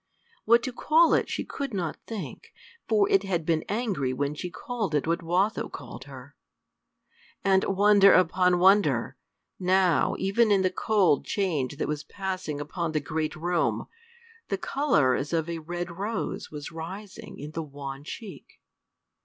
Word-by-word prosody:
what 235 +2 +5
to 255 - -3
call 320 +6 +4
it - - +2
she - - -2
could 275 -6 -5
not 175 -4 -2
think, 220 -4 -7 0.3
for 210 -3 +3
it 195 - +5
had 180 -5 -2
been 160 -1 +1
angry 200 - -1
when 140 +3 -1
she 175 +4 -5
called 210 -3 -3
it 145 - +1
what 170 +2 0
Watho 180 +6 0
called 130 -2 -9
her. 135 0 -12 1.1
And, 190 -1 +4
wonder 200 0 +5
upon 180 0 +4
wonder! 195 +3 +3 0.4
now, 185 -1 +3
even 210 +4 +2
in 195 -2 +4
the 185 - +2
cold 195 -7 +2
change 150 - -1
that - - -2
was 150 0 -3
passing 185 -7 -4
upon 160 +2 -3
the 155 - +2
great 155 +1 -3
room, 175 +2 0 0.6
the - - -1
color 155 - +2
as 145 +5 -2
of 165 -1 0
a 170 -1 -4
red 175 +2 -5
rose 205 +6 -4
was 150 0 -7
rising 195 +6 -8
in 150 +2 -7
the 165 - -4
wan 140 -2 -7
cheek. 205 +6 -10
180 Hz, 160 wpm, -27 LUFS, 155-200 Hz, 1.1 s, what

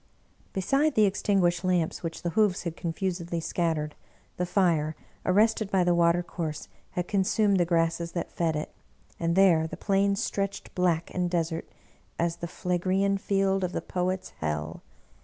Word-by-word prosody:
Be 190 - -1
side 275 +8 +2
the 215 - +6
extinguished 190 -3 +1
lamps 180 -3 0
which 165 -1 -5
the 175 - -1
hoofs 205 -1 +2
had 170 -2 -4
confusedly 170 0 -3
scattered, 160 -3 -1 0.4
the 180 - -1
fire, 165 -5 +2 0.3
arrested 215 +2 +3
by 190 -2 +3
the 175 0 +3
water 170 0 +3
course, 160 -3 -5 0.3
had 180 0 -2
con 200 -2 +2
sumed 200 +1 +2
the 175 - +3
grasses 165 0 0
that 170 - -3
fed 165 -2 0
it, 150 - -4 0.5
and 170 0 0
there 175 -5 +5
the - - -8
plains 200 0 +1
stretched 200 0 -3
black 170 -2 0
and 180 -1 0
desert 165 -2 -2 0.5
as 170 0 0
the 170 - -5
Phlegraean 185 +3 0
Field 195 -1 +1
of 180 0 -2
the - - -2
Poet's 185 0 -2
Hell. 75 +1 -3
175 Hz, 165 wpm, -27 LUFS, 165-195 Hz, 0.5 s, the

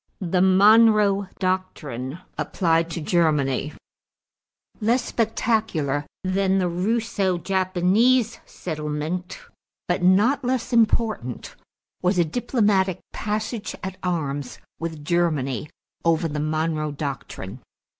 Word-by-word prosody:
=The 180 -2 0
Monroe 205 +1 +5
Doctrine 165 -8 -3 0.2
Applied 165 -2 +1
to 165 0 -4
Germany.= 150 -4 +1 1.1
Less 235 +3 +1
spectacular 215 - 0 0.2
than 190 +1 +1
the 185 -2 +1
Russo 195 +1 0
Japanese 195 +7 +2
settlement 155 +2 -4 0.5
but 175 - 0
not 205 +10 +4
less 250 -1 -1
important 220 - +1 0.5
was 180 +1 +1
a 175 - +4
diplomatic 200 - +1 0.2
passage 215 +1 -3
at 190 0 -5
arms 145 -7 -3 0.2
with 160 -3 -5
Germany 150 -6 0 0.3
over 165 0 +2
the 150 -1 -4
Monroe 155 0 -1
Doctrine. 135 -7 -6
180 Hz, 95 wpm, -23 LUFS, 155-210 Hz, 1.1 s, Monroe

